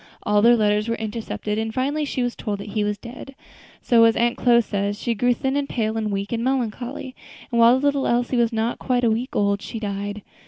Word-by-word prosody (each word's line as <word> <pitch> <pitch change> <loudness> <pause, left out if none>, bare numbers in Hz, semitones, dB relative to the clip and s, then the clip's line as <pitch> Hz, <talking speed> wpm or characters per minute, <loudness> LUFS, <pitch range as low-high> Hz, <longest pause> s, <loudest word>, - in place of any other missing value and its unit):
All 210 0 +2
their 240 +2 +6
letters 210 -1 +1
were 230 - 0
intercepted, 215 -1 -4
and 220 0 -2
finally 280 +5 -1
she 260 -3 -2
was 245 -1 -2
told 210 -2 -3
that 200 +1 -8
he 210 0 -1
was 205 0 -1
dead; 250 +4 -10 0.5
so, 230 -2 +5
as 225 - +4
Aunt 235 +1 +1
Chloe 240 -1 +4
says, 205 -1 -2
'she 235 - -1
grew 245 +3 +1
thin 265 +3 -2
and 285 -1 -1
pale, 220 -2 -1
and 215 -2 -2
weak 200 0 -3
and 230 -1 -1
melancholy,' 255 +1 -3 0.4
and 235 - +1
while 235 +2 +6
the 285 - -2
little 280 -1 +1
Elsie 245 +1 +1
was 235 -1 +2
yet 225 - -4
not 225 +2 -1
quite 250 -1 0
a 230 - +3
week 240 +4 -3
old, 200 0 +1
she 225 - -6
died. 205 0 -4
230 Hz, 240 wpm, -22 LUFS, 210-245 Hz, 0.5 s, their